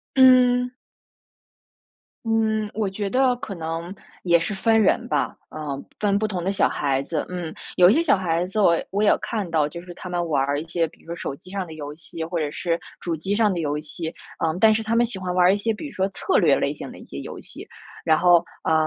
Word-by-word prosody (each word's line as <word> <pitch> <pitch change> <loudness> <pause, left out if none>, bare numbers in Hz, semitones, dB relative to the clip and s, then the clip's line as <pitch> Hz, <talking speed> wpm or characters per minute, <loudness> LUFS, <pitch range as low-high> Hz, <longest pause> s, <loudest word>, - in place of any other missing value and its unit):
嗯。 250 -1 +6 1.5
嗯， 220 -1 +1
我 210 -3 -1
觉 200 +1 -3
得 255 +2 +3
可 230 -7 -6
能 165 +2 -4 0.3
也 170 -1 +5
是 205 +5 -3
分 225 +3 +3
人 235 +4 +2
吧， - - 0 0.2
呃， 145 -3 -5 0.2
分 200 -1 +2
不 215 - 0
同 185 -5 -3
的 190 - 0
小 195 - +3
孩 135 -2 0
子。 150 +2 -3
嗯， 175 -3 -5 0.2
有 180 0 +8
一 - - +5
些 320 - +3
小 280 -10 +4
孩 175 -2 0
子 190 +4 -3
我 175 -5 +5
我 200 +2 -1
也 215 - +5
看 210 -6 -3
到， 155 -3 +1
就 170 +2 -8
是 180 -1 -9
他 185 - -9
们 175 -1 -1
玩 140 -4 +2
儿 145 +1 0
一 - - -4
些 170 0 +1
比 - - -23
如 - - -24
说 170 +1 -5
手 170 - -4
机 180 +5 -17
上 195 -2 -3
的 160 - -10
游 145 -1 -7
戏 165 0 -7
或 170 +1 -3
者 150 -3 -1
是 170 +2 -1 0.2
主 170 -2 -2
机 175 +6 -2
上 210 -1 +3
的 175 - -2
游 150 -1 -1
戏。 160 +2 -5 0.3
呃， 160 -1 +1
但 220 0 +6
是 225 - -1
他 220 +1 -2
们 235 +1 +4
喜 225 -4 -5
欢 185 -1 -3
玩 180 0 +4
儿 185 - +6
一 - - +1
些 225 +2 0
比 220 - -7
如 - - -10
说 190 - +1
策 370 - 0
略 - - +4
类 - - 0
型 - - -8
的 - - -12
一 - - -12
些 - - -9
游 - - -7
戏。 - - -9 0.4
然 160 -1 +4
后 175 0 +5 0.2
呃， - - +1
180 Hz, 265 characters per minute, -23 LUFS, 165-215 Hz, 1.5 s, 有